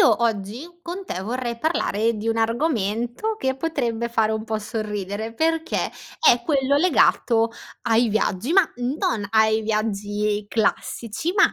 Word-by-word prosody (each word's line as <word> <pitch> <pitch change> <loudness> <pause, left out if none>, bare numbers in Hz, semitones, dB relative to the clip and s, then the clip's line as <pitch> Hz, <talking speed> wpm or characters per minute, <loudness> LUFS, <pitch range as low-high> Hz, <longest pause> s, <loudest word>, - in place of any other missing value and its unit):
io 230 0 +5
oggi 230 - -2
con 355 +3 -6
te 185 - -4
vorrei 235 +2 -3
parlare 230 -7 0
di 215 +2 -3
un 225 - +1
argomento 235 - 0
che 265 -8 -1
potrebbe 240 -7 -1
fare 225 -2 +1
un 220 0 -2
po' 220 -1 -2
sorridere, 210 0 -4
perché 325 +4 0 0.4
è 435 - +6
quello 280 -2 +2
legato 245 -8 +3 0.3
ai 230 0 +3
viaggi. 220 - 0
Ma 385 +1 +7
non 245 - -1
ai 220 0 +4
viaggi 210 -1 -1
classici, 230 - -1
ma 405 - +5
230 Hz, 140 wpm, -23 LUFS, 215-280 Hz, 0.4 s, Ma